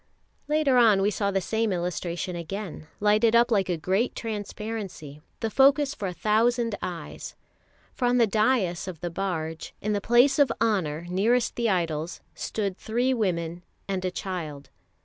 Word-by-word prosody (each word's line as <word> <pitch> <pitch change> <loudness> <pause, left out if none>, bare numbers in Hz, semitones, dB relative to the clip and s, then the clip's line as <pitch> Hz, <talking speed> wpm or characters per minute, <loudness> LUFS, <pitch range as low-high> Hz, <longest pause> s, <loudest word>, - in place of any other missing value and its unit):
Later 300 -3 +3
on 215 -5 +5
we 205 - +2
saw 200 0 0
the 195 -1 0
same 220 +3 0
illustration 175 0 -3
again, 175 -1 -6
lighted 215 +2 +4
up 235 +1 +5
like 195 -4 +2
a 175 - 0
great 190 +9 0
transparency, 210 -8 -5 0.2
the 225 - -1
focus 275 +2 +4
for 205 - -4
a - - -3
thousand 230 +4 +1
eyes. 175 -2 -6 0.6
For 250 - -2
on 245 0 +3
the 235 - +5
daïs 210 -5 +1
of 175 -4 -6
the 175 - -3
barge, 165 -3 -4
in 210 +1 -1
the 205 - -1
place 240 +7 +4
of 280 -4 +5
honour 170 -8 0
nearest 225 +7 +1
the 235 -1 +1
idols, 165 -3 -1
stood 200 -3 -3
three 245 +4 0
women 175 -7 -1 0.3
and 190 -2 -2
a 185 - 0
child. 170 -7 -6
200 Hz, 165 wpm, -26 LUFS, 175-230 Hz, 0.6 s, on